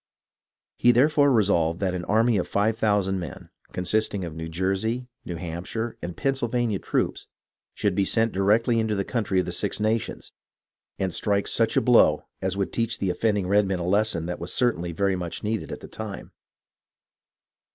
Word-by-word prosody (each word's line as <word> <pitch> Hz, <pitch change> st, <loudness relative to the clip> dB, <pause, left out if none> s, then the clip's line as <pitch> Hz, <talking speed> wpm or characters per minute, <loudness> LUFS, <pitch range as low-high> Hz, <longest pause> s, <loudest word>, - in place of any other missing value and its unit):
He 120 Hz, -, +5 dB
therefore 145 Hz, +3 st, +4 dB
resolved 90 Hz, -8 st, +2 dB
that 95 Hz, -2 st, 0 dB
an 90 Hz, -1 st, -4 dB
army 110 Hz, +1 st, +3 dB
of 90 Hz, -, -1 dB
five 105 Hz, +2 st, +1 dB
thousand 100 Hz, -4 st, +1 dB
men, 85 Hz, -5 st, -8 dB, 0.2 s
consisting 95 Hz, +1 st, 0 dB
of 85 Hz, -, -6 dB
New 80 Hz, +1 st, -6 dB
Jersey, 95 Hz, +8 st, -1 dB, 0.2 s
New 85 Hz, -, -4 dB
Hampshire, 90 Hz, +7 st, -4 dB
and 85 Hz, 0 st, -6 dB
Pennsylvania 120 Hz, -6 st, 0 dB
troops, -, -, -2 dB, 0.5 s
should 100 Hz, -3 st, 0 dB
be 100 Hz, -, +1 dB
sent 115 Hz, +3 st, +2 dB
directly 110 Hz, +5 st, +2 dB
into 110 Hz, -1 st, 0 dB
the 100 Hz, -1 st, -1 dB
country 105 Hz, -6 st, 0 dB
of 90 Hz, -, 0 dB
the -, -, -4 dB
Six -, -, -1 dB
Nations, 110 Hz, +1 st, -1 dB, 0.7 s
and 95 Hz, -2 st, -1 dB
strike 100 Hz, -1 st, 0 dB
such -, -, +1 dB
a -, -, +5 dB
blow -, -, +4 dB, 0.2 s
as 95 Hz, 0 st, -2 dB
would 100 Hz, -, -2 dB
teach 115 Hz, 0 st, -1 dB
the 95 Hz, -2 st, 0 dB
offending 105 Hz, 0 st, 0 dB
redmen 100 Hz, -1 st, +2 dB
a 85 Hz, -, -3 dB
lesson 100 Hz, -3 st, +1 dB
that 90 Hz, +1 st, -4 dB
was 85 Hz, -, -5 dB
certainly 90 Hz, -9 st, 0 dB
very 95 Hz, +3 st, 0 dB
much 85 Hz, -2 st, -5 dB
needed 110 Hz, 0 st, -2 dB
at -, -, -6 dB
the -, -, -9 dB
time. 110 Hz, -3 st, -7 dB
100 Hz, 175 wpm, -25 LUFS, 90-110 Hz, 0.7 s, He